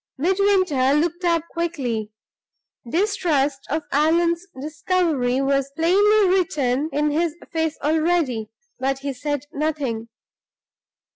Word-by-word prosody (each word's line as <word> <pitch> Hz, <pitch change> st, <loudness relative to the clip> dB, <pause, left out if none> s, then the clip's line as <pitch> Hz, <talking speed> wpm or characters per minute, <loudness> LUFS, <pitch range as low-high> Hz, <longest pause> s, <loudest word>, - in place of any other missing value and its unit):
Midwinter 365 Hz, -5 st, +2 dB
looked 340 Hz, +4 st, 0 dB
up 335 Hz, -2 st, +2 dB
quickly. 260 Hz, -11 st, -2 dB, 0.8 s
Distrust 320 Hz, -, +1 dB
of 310 Hz, +1 st, -1 dB
Allan's 335 Hz, +4 st, +2 dB
discovery 300 Hz, -4 st, 0 dB
was 275 Hz, 0 st, 0 dB
plainly 400 Hz, +5 st, +4 dB
written 305 Hz, -7 st, +1 dB
in 300 Hz, 0 st, +1 dB
his 325 Hz, +1 st, 0 dB, 0.2 s
face 320 Hz, -1 st, -1 dB
already; 310 Hz, -7 st, +1 dB, 0.3 s
but 270 Hz, +1 st, 0 dB
he 280 Hz, -, -1 dB
said 290 Hz, +2 st, -3 dB
nothing. 280 Hz, -7 st, -2 dB
310 Hz, 100 wpm, -22 LUFS, 275-345 Hz, 0.8 s, plainly